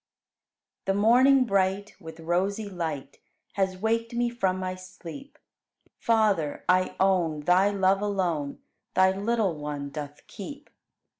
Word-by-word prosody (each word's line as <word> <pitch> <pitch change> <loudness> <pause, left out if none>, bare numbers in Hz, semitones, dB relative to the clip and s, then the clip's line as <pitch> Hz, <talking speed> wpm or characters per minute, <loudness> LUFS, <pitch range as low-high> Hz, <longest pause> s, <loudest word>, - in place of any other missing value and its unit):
2. 195 - +3
The - - -1
morning 255 +5 +6
bright 200 -1 0
With 160 -2 -10
rosy 190 +6 -1
light 160 -7 -5 0.3
Has 190 -2 0
waked 230 +3 -1
me 240 0 +1
from 190 -6 0
my 185 0 -3
sleep; 185 - -11 0.6
Father, 210 -10 +1
I 185 0 +2
own 175 -6 +2
Thy 180 +6 +4
love 195 -1 +2
alone 175 -8 -2 0.3
Thy 190 0 +5
little 210 -2 0
one 145 -2 -5
doth 145 0 -7
keep. 285 +8 -9
190 Hz, 130 wpm, -27 LUFS, 170-210 Hz, 0.6 s, morning